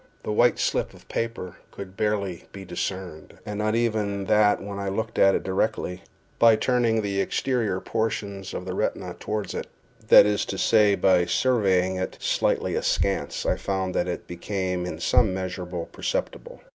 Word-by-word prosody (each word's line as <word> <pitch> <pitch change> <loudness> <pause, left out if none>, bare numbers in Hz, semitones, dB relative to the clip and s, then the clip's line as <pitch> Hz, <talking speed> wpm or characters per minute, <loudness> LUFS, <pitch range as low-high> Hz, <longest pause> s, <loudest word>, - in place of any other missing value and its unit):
The - - -3
white 120 +3 +3
slip - - -1
of - - -18
paper 115 -6 -4
could 95 -1 -9
barely 100 -4 -2
be 95 -1 -9
discerned, 90 -4 -5
and 105 0 -5
not 110 +1 +1
even 105 -4 0
that 105 0 +4
when 100 0 -6
I 100 -1 -2
looked 110 +3 -3
at 95 0 +6
it - - -1
directly; 95 -1 -1 0.4
by 115 -1 +7
turning 115 -1 +1
the 100 -1 0
exterior 110 -3 -1
portions 100 -3 -3
of 90 - -5
the 95 - -4
retina - - -2
toward 105 -1 -3
it—that - - +3
is 105 0 +1
to 95 - -5
say, 105 -2 +4
by 90 -3 +3
surveying 95 -5 +2
it 95 - -4
slightly - - 0
askance, - - -1
I - - +1
found 95 -1 -2
that 90 - 0
it 90 - -4
became 90 0 -3
in - - -6
some 95 - +3
measure 95 -1 -4
perceptible. 480 - -4
100 Hz, 165 wpm, -25 LUFS, 95-110 Hz, 0.4 s, by